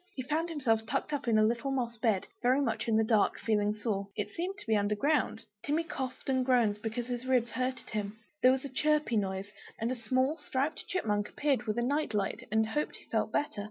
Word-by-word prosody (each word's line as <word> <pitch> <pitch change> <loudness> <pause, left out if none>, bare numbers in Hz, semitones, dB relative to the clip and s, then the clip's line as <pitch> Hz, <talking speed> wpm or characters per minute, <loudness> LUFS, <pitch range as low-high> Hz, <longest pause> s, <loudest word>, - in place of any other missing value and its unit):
He 260 - -3
found 315 +6 -1
himself 245 -9 +1
tucked 270 +4 -1
up 285 -4 -2
in 225 -2 +4
a 215 - +5
little 235 +5 +1
moss 245 -3 -1
bed, 220 -5 +1 0.2
very 255 +2 +4
much 240 -5 -1
in 220 -1 +3
the 220 - +4
dark, 220 -2 +3
feeling 210 -2 +1
sore; 210 -2 -2
it 210 - -3
seemed 370 +4 -3
to - - -10
be 220 -2 +2
under 205 0 +2
ground. 285 -1 +1 0.2
Timmy 305 +3 +1
coughed 265 -5 -5
and 260 -1 +2
groaned, 235 -5 +2
because 225 +2 -3
his 245 +1 -4
ribs 245 -2 +2
hurted 255 +1 -3
him. 210 -1 -3 0.2
There 255 - +7
was 265 +1 0
a - - -4
chirpy 300 -1 +1
noise, 195 0 -2 0.3
and 230 +2 -1
a - - -1
small 260 +6 +1
striped 275 +4 -2
Chipmunk 210 - 0
appeared 275 -5 0
with 215 - -1
a 240 - +1
night 280 -3 0
light, 200 -2 -1
and 220 0 +3
hoped 295 +6 -1
he - - -13
felt - - +1
better? 260 -7 -1
240 Hz, 230 wpm, -31 LUFS, 215-270 Hz, 0.3 s, There